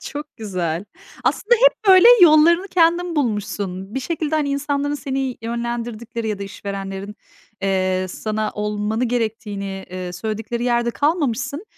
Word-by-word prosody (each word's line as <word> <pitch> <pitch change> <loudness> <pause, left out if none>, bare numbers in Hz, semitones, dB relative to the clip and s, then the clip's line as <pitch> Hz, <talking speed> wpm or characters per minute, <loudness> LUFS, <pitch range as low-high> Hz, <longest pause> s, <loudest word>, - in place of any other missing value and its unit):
Çok 295 0 -8
güzel. 180 -5 -3 0.4
Aslında 480 +3 +3
hep, - - +4
böyle, 375 +2 +8 0.2
yollarını 340 +3 +6
kendin 345 -1 +2
bulmuşsun. 205 -6 -2
Bir 265 - -1
şekilde, 315 +2 -2
hani, 300 -2 +1
insanların 285 +1 -1
seni 270 -3 -3
yönlendirdikleri 235 -1 -4
ya 210 - -2
da 200 - -5
işverenlerin, 195 0 -6 0.5
eee, 185 -1 0
sana 215 +3 -3
olmanı 210 +2 -1
gerektiğini, 215 -5 -3
eee, 180 -1 -5
söyledikleri 220 +5 -4
yerde 240 -1 +1
kalmamışsın. 290 - -1
230 Hz, 125 wpm, -21 LUFS, 200-290 Hz, 0.5 s, böyle